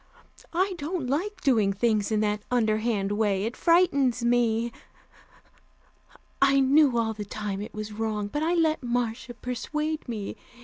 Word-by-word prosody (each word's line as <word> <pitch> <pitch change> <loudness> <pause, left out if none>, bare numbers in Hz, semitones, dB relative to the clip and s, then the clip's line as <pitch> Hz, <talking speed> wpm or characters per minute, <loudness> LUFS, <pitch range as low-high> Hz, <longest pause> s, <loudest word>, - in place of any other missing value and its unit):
I 375 +2 +2
don't 310 0 -3
like 365 +9 -2
doing 220 -7 +3
things 215 0 +1
in 215 -1 +2
that 210 0 0
underhand 220 -4 +1
way; 205 -2 +1
it 230 +3 -3
frightens 280 -9 +3
me. 235 -1 +2 1.7
I 275 0 +5
knew 270 -1 +4
all 225 -1 +1
the 210 -1 -6
time 205 -1 -4
it 210 - -8
was 215 0 -5
wrong, 215 -1 -2
but 295 +9 -3
I 335 +3 +1
let 320 -2 +2
Marcia 240 0 -2
persuade 300 +5 -3
me. 215 -4 -5
235 Hz, 145 wpm, -26 LUFS, 215-285 Hz, 1.7 s, I